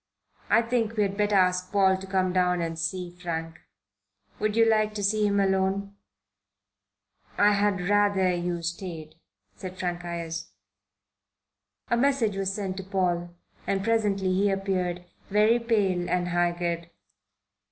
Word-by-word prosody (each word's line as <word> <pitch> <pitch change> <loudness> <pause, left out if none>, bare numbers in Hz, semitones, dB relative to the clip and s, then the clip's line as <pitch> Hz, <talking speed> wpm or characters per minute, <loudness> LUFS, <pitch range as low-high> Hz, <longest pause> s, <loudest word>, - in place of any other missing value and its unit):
"I 235 - +4
think 230 -1 -1
we 210 - +4
had 195 -1 -2
better 205 0 +1
ask 180 -1 +2
Paul 195 -2 +4
to 190 +1 -9
come 185 -1 0
down 180 -1 +2
and 165 -1 -3
see 180 +1 -3
Frank. 165 -2 -5 0.8
Would 215 0 0
you 230 0 +5
like 215 -1 +2
to 205 - -3
see 210 +1 +2
him 200 0 +1
alone?" 195 +1 0 1.4
"I 205 +1 +5
had 200 -3 +1
rather 200 -2 +3
you 175 -1 -2
stayed," 165 -2 -5 0.4
said 185 0 -8
Frank 175 -1 -3
Ayres. 170 -1 -5 1.4
A 235 - +3
message 250 -5 +2
was 195 -1 -1
sent 195 -2 -4
to 195 - -5
Paul, 175 -2 -1 0.3
and 195 -1 0
presently 205 -4 +1
he 200 +2 +2
appeared, 185 -2 -2 0.2
very 215 +4 +4
pale 200 -7 0
and 180 0 0
haggard. 175 -1 -1
190 Hz, 140 wpm, -26 LUFS, 175-205 Hz, 1.4 s, you